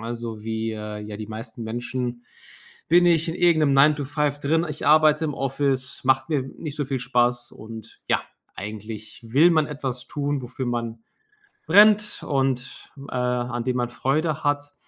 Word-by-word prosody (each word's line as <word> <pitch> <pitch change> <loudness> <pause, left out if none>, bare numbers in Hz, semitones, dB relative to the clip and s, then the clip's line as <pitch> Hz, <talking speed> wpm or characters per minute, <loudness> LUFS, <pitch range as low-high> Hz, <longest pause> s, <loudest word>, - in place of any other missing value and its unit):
Also, 115 -2 -6
wie, 110 0 -2
äh, 105 -1 -6
ja 105 0 -7
die 105 -1 -6
meisten 115 +1 -8
Menschen 120 +1 -4 0.6
bin 175 +2 +6
ich 165 0 +3
in 165 - -2
irgend 170 -3 +3
'nem 140 -1 +3
Nine-to-Five 145 0 +2
drin. 160 +4 +1
Ich 150 0 -5
arbeite 155 +1 +5
im 150 - -2
Office, 135 -1 -1
macht 130 +3 +2
mir 145 -4 +1
nicht 145 +2 -8
so 145 - -1
viel 135 -1 -3
Spaß 120 -1 +1
und, 110 0 -11
ja, - - +2 0.3
eigentlich 110 +2 -8
will 150 +9 +5
man 155 -3 +3
etwas 135 -4 -5
tun, 145 -1 -2
wofür 130 +1 -5
man 115 -2 -3 0.6
brennt 210 +4 +5
und, 135 -2 -1 0.2
äh, - - -8
an 125 -1 -1
dem 125 0 0
man 120 -1 -1
Freude 155 +5 -1
hat. 145 0 -1
130 Hz, 165 wpm, -24 LUFS, 120-150 Hz, 0.6 s, bin